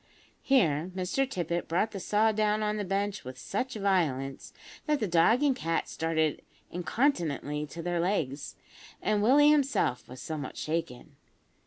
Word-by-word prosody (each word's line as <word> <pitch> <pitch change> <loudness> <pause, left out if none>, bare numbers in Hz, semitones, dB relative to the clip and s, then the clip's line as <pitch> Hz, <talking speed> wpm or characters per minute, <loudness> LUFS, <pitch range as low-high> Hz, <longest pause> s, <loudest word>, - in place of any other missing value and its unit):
Here 175 - +2
Mr 190 +9 0
Tippet 175 - -2
brought 185 +7 0
the 200 - -5
saw 210 +4 +2
down 215 0 +1
on 210 0 0
the 210 - -2
bench 200 +1 -2
with 130 0 -8
such 240 - -3
violence, 160 -10 -1 0.4
that 300 -1 +2
the 215 - -1
dog 180 - +4
and 280 -3 +3
cat 165 -9 -1
started 160 -2 -1 0.3
incontinently 165 - -1
to 165 +4 -8
their 175 0 -1
legs, 155 -7 -1 0.4
and 210 -1 +1
Willie 290 +7 +6
himself 275 - +1
was 130 0 -9
somewhat 155 -2 -5
shaken. 160 -6 -4
185 Hz, 150 wpm, -29 LUFS, 160-215 Hz, 0.4 s, Willie